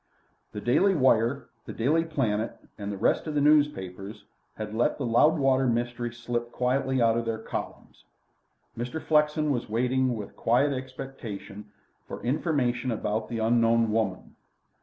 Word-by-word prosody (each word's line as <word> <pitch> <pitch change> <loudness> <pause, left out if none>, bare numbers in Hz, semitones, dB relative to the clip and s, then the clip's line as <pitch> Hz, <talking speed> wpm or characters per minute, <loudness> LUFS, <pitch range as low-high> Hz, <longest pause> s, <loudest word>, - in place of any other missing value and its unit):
The 105 - -6
Daily 185 - +3
Wire, 130 -2 +2 0.2
the - - -7
Daily 150 +8 +2
Planet, 120 -9 -1 0.2
and 100 0 -5
the 100 - -5
rest 110 - +1
of 155 - -3
the - - +3
newspapers 105 -9 +1 0.3
had 105 -1 -6
let 115 +2 +1
the - - -3
Loudwater 135 +1 +3
mystery 120 0 -1
slip 120 0 -4
quietly 130 +1 0
out 115 -1 +3
of 115 - -4
their 115 -1 -2
columns. 110 - -7 0.7
Mr. 120 +7 -4
Flexen 150 -1 +2
was 120 -4 -2
waiting 125 +2 +1
with 105 -2 -8
quiet 135 +5 +2
expectation 130 -6 -7 0.4
for - - -8
information 130 -3 0
about 110 0 -2
the 115 - -3
unknown 115 0 +3
woman. 105 -4 -2
120 Hz, 145 wpm, -27 LUFS, 110-135 Hz, 0.7 s, Daily